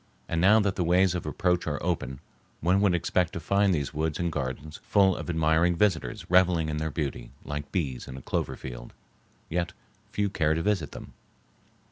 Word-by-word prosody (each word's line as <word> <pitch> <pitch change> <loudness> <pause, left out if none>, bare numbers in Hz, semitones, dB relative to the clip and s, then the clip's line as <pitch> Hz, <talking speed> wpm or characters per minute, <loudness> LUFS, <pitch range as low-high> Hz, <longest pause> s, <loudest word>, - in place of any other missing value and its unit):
And 85 - -1
now 105 +4 +6
that 100 -3 0
the 90 - +1
ways 90 +2 +3
of 90 -3 -4
approach 90 +2 0
are 75 -2 -1
open 80 -7 -2 0.4
one 90 +4 +2
would 100 -4 +3
expect 90 0 0
to - - -3
find 100 +4 +2
these 75 -5 -1
woods 80 0 -1
and 85 -1 -1
gardens 75 +2 -4
full 95 -3 +3
of - - -6
admiring 80 +1 +3
visitors 95 -3 0
reveling 90 -3 +3
in 75 - -2
their 80 +1 -1
beauty 70 -7 -4 0.2
like 75 0 -5
bees 70 -9 -2
in 65 - -7
a - - -8
clover - - -2
field. - - -9 0.5
Yet 85 +1 -2 0.4
few 105 0 0
care 80 -5 +1
to 80 - -1
visit 95 -8 0
them. - - -10
85 Hz, 190 wpm, -27 LUFS, 75-90 Hz, 0.5 s, now